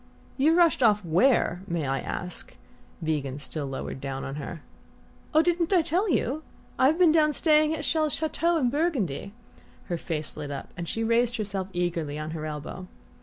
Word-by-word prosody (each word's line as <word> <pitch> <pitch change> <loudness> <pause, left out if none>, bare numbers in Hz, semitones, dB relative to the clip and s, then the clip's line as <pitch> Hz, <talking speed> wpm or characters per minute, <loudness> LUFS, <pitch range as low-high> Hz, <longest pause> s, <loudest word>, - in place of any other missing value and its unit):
"You 305 +4 +4
rushed 340 -5 +4
off 210 -4 +4
where, 180 +1 +3
may 170 -5 -1
I 135 0 0
ask?" 180 0 -5 0.5
Van 160 0 +1
Degen 135 -2 -5
still 145 0 -4
lowered 135 0 -5
down 135 -1 -4
on 135 - -5
her. 150 +2 -6 0.7
"Oh 315 0 +5
didn't 345 0 +1
I 360 -4 +5
tell 365 +7 +1
you? 295 -1 0 0.4
I've 275 +5 +4
been 355 -3 +6
down 305 -1 +4
staying 305 0 +4
at 305 - -5
Chelles' 310 -1 +1
chateau 330 +2 +1
in 250 -6 +1
Burgundy." 260 - -1 0.6
Her 175 -2 -1
face 155 -4 -3
lit 150 -2 -6
up 140 -1 -6
and 170 -2 -5
she 225 - -2
raised 235 +1 +2
herself 200 -3 -3
eagerly 170 -5 -2
on 155 +1 -4
her 155 -1 -4
elbow. 155 +5 -6
205 Hz, 180 wpm, -27 LUFS, -, 0.7 s, been